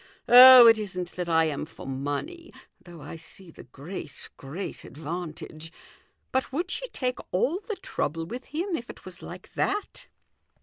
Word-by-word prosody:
Oh, 250 Hz, 0 st, +11 dB
it 225 Hz, -1 st, +7 dB
isn't 180 Hz, -4 st, -5 dB
that 180 Hz, -1 st, -5 dB
I 165 Hz, 0 st, +4 dB
am 150 Hz, -3 st, -3 dB
for -, -, -12 dB
money, 145 Hz, -, -5 dB, 0.3 s
though 170 Hz, -3 st, -12 dB
I -, -, -8 dB
see 170 Hz, +2 st, -11 dB
the -, -, -14 dB
great, 145 Hz, +3 st, -9 dB
great 150 Hz, +8 st, -7 dB
advantage. 160 Hz, +1 st, -7 dB, 0.6 s
But 260 Hz, 0 st, -1 dB
would 345 Hz, +7 st, -3 dB
she -, -, -3 dB
take 255 Hz, -, -3 dB
all 280 Hz, -, 0 dB
the 430 Hz, 0 st, -6 dB
trouble 165 Hz, -, -3 dB
with 245 Hz, +7 st, -7 dB
him 340 Hz, +5 st, -3 dB
if 240 Hz, -5 st, -7 dB
it -, -, -12 dB
was 185 Hz, -2 st, -10 dB
like -, -, -11 dB
that?" 415 Hz, +5 st, -3 dB
185 Hz, 165 wpm, -26 LUFS, 160-260 Hz, 0.6 s, Oh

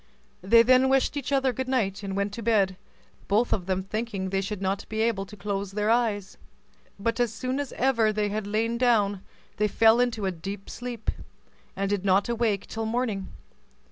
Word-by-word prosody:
They 230 Hz, +5 st, +6 dB
then 255 Hz, +2 st, +5 dB
wished 270 Hz, +2 st, +2 dB
each 280 Hz, -2 st, -4 dB
other 270 Hz, -2 st, +2 dB
good 260 Hz, +2 st, -3 dB
night, 215 Hz, -7 st, 0 dB
and 195 Hz, -1 st, -4 dB
went 200 Hz, 0 st, -1 dB
to 230 Hz, -, -5 dB
bed, 205 Hz, -4 st, +2 dB, 0.5 s
both 220 Hz, +4 st, +2 dB
of 180 Hz, -3 st, -2 dB
them 190 Hz, 0 st, 0 dB
thinking 200 Hz, -2 st, -3 dB
they 195 Hz, 0 st, +1 dB
should 195 Hz, +1 st, -4 dB
not 195 Hz, +1 st, -1 dB
be 220 Hz, -, -3 dB
able 215 Hz, -4 st, 0 dB
to 210 Hz, -, -12 dB
close 195 Hz, 0 st, -3 dB
their 210 Hz, +1 st, +1 dB
eyes; 220 Hz, -5 st, 0 dB, 0.6 s
but 230 Hz, +4 st, -1 dB
as 240 Hz, -3 st, +2 dB
soon 255 Hz, +4 st, -3 dB
as 285 Hz, -3 st, -3 dB
ever 230 Hz, -5 st, +2 dB
they 210 Hz, -1 st, 0 dB
had 210 Hz, 0 st, -3 dB
lain 225 Hz, +3 st, 0 dB
down, 210 Hz, -6 st, +2 dB, 0.4 s
they 210 Hz, -, +2 dB
fell 225 Hz, +3 st, +4 dB
into 235 Hz, -4 st, 0 dB
a 190 Hz, -, +1 dB
deep 195 Hz, +3 st, -7 dB
sleep, 240 Hz, -2 st, -4 dB, 0.6 s
and 195 Hz, +1 st, -1 dB
did 200 Hz, -2 st, 0 dB
not 195 Hz, 0 st, +3 dB
awake 225 Hz, -4 st, 0 dB
till 225 Hz, 0 st, -4 dB
morning. 220 Hz, -5 st, -1 dB
215 Hz, 195 wpm, -26 LUFS, 195-235 Hz, 0.6 s, They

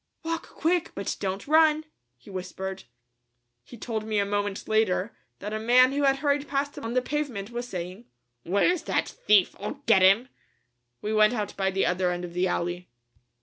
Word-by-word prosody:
"Walk 330 Hz, +1 st, -3 dB
quick, 340 Hz, +1 st, 0 dB
but 200 Hz, -, -3 dB
don't 195 Hz, +3 st, -3 dB
run," 310 Hz, 0 st, +4 dB, 0.3 s
he 120 Hz, -, -15 dB
whispered. 190 Hz, +1 st, -6 dB, 0.8 s
He 235 Hz, -, -13 dB
told 220 Hz, -1 st, -4 dB
me 215 Hz, -1 st, -2 dB
a 200 Hz, -, +2 dB
moment 205 Hz, 0 st, -2 dB
later 215 Hz, -1 st, +1 dB, 0.2 s
that 210 Hz, +1 st, -6 dB
a 215 Hz, -, -2 dB
man 250 Hz, +3 st, +5 dB
who 285 Hz, +1 st, -1 dB
had 270 Hz, 0 st, +4 dB
hurried 285 Hz, +1 st, 0 dB
past 285 Hz, 0 st, -2 dB
him -, -, -8 dB
on 230 Hz, +2 st, -4 dB
the 255 Hz, -, +2 dB
pavement 255 Hz, -8 st, -3 dB
was 240 Hz, +1 st, -4 dB
saying, 185 Hz, +3 st, -6 dB, 0.4 s
"Where's 200 Hz, -, +2 dB
that -, -, 0 dB
thief? 205 Hz, -3 st, +3 dB
I'll 280 Hz, +8 st, -6 dB
get 210 Hz, -5 st, +5 dB
him!" 200 Hz, +7 st, +5 dB, 0.7 s
We 210 Hz, +1 st, -1 dB
went 215 Hz, +1 st, +5 dB
out 210 Hz, -3 st, -3 dB
by 195 Hz, -1 st, 0 dB
the 190 Hz, 0 st, 0 dB
other 180 Hz, 0 st, +1 dB
end 175 Hz, 0 st, -3 dB
of 170 Hz, -, -9 dB
the 180 Hz, +1 st, +1 dB
alley. 175 Hz, 0 st, -3 dB
215 Hz, 190 wpm, -26 LUFS, 190-270 Hz, 0.8 s, man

